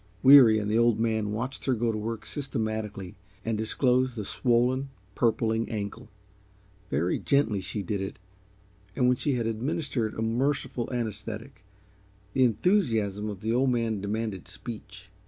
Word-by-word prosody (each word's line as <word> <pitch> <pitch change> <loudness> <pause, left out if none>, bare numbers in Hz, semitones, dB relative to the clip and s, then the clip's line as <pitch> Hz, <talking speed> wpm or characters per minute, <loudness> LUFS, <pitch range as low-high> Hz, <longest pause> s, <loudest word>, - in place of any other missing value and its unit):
Weary 130 -5 +9
and 105 -1 -2
the 110 - +3
Old 115 -2 +3
Man 110 -2 0
watched 125 +5 -4
her 130 - +2
go 115 0 0
to 110 - -3
work 115 +1 -4
systematically 110 -8 -4 0.3
and 115 -1 0
disclose 125 +3 +1
the 105 -3 -4
swollen, 125 +4 +1 0.2
purpling 115 0 +1
ankle. 105 -3 -5 0.8
Very 80 +6 0
gently 115 -8 +1
she 100 +2 -4
did 100 +1 -2
it, 95 - -5 0.8
and 125 -2 +3
when 125 0 +3
she 145 - 0
had 120 -2 -1
administered 120 0 -2
a 110 - -2
merciful 125 +1 -1
anaesthetic, 110 0 -5 0.7
the 130 - +3
enthusiasm 110 - +1
of 100 -2 -7
the 110 +1 0
Old 130 +2 +3
Man 115 -4 0
demanded 105 -2 -3
speech. 105 -4 -8
115 Hz, 150 wpm, -27 LUFS, 105-125 Hz, 0.8 s, Weary